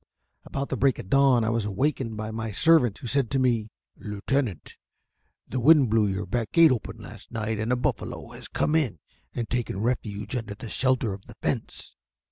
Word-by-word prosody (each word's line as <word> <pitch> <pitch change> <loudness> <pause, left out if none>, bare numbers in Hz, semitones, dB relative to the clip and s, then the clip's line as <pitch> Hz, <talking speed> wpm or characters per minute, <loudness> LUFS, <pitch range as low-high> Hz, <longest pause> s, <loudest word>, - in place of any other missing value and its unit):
About 140 0 -4
the 130 - -2
break 135 +2 +3
of 95 - -9
dawn 135 -4 +5
I 110 - +1
was 115 -2 0
awakened 115 +2 -1
by 110 0 -4
my 110 0 -4
servant, 125 -1 +4
who - - -11
said 125 0 +1
to 135 - 0
me: 120 -4 +1 0.3
"Lieutenant, 105 - -3 0.7
the 130 - -2
wind 140 -2 +6
blew 110 -2 +3
your 95 0 -2
back 120 -3 -2
gate 165 -3 +7
open 115 -3 -3
last 105 -1 -11
night, 110 -2 -2
and 110 +3 -1
a - - +4
buffalo 125 - -3
has - - -9
come 150 - 0
in 145 - +1 0.4
and 120 -2 -2
taken 120 -5 -2
refuge 105 -1 -2
under 110 -4 -4
the 110 - -8
shelter 130 -5 +1
of 95 0 -11
the - - -12
fence." - - -3
115 Hz, 195 wpm, -26 LUFS, 105-130 Hz, 0.7 s, gate